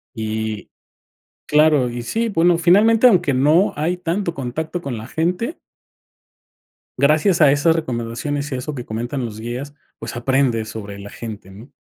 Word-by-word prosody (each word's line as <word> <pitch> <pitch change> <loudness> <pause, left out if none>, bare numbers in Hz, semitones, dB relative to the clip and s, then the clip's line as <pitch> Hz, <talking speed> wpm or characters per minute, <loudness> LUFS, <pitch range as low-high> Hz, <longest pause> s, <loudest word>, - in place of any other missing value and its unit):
y 110 -1 -4 0.8
claro. 150 -4 +4
Y 120 0 -5
sí, 230 - -1
bueno, 170 -3 +3
finalmente, 215 +7 +4
aunque 175 - +3
no 150 +9 +3
hay 170 +4 -1
tanto 175 0 -2
contacto 155 +7 -4
con 130 -7 -4
la 110 +2 -8
gente 180 - -2 1.4
gracias 155 +5 +3
a 145 -3 +7
esas 160 +3 +3
recomendaciones 140 +1 -3
y 130 - -2
eso 135 +4 -4
que 125 -3 -6
comentan 120 +4 -4
los 110 -2 -6
guías, 125 +6 -6 0.2
pues, - - -7
aprendes 120 -3 0
sobre 100 -2 -7
la 100 0 -10
gente, 105 -4 -8
¿no? 110 +8 -13
140 Hz, 150 wpm, -20 LUFS, 115-165 Hz, 1.4 s, a